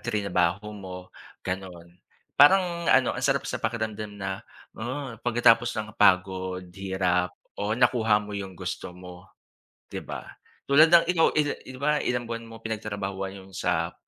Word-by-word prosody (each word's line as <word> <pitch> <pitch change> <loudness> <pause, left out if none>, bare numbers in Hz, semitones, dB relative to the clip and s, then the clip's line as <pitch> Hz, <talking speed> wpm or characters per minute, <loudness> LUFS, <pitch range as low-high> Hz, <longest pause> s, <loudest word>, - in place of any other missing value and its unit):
tinrabaho 100 -2 -1
mo, 95 -2 -8 0.5
ganun, 90 -2 -6 0.4
parang 170 +2 +5
ano - - +4
ang - - -5
sarap - - +1
sa - - -3
pakiramdam 110 -2 -3
na, 95 +1 -4 0.3
oo, 130 +3 -5
pagkatapos 120 0 +4
ng 105 0 -3
pagod, 95 -2 +2
hirap 95 -2 0 0.2
o 105 +1 -2
nakuha 115 -4 +4
mo 105 0 -7
yung 95 -3 -6
gusto - - -5
mo, 90 0 -12 0.6
'di - - -4
ba, - - -7 0.4
tulad 155 +4 +6
ng 170 0 +7
ikaw 165 -2 +4
ilan 150 -1 +1
'di 130 0 -10
ba 140 +3 +1
ilang 125 -1 -1
buwan 115 0 -5
mo 115 - -10
pinagtrabahuhan 100 -3 -4
yung 95 0 -17
sa 85 -2 -1
105 Hz, 150 wpm, -26 LUFS, 95-120 Hz, 0.6 s, ng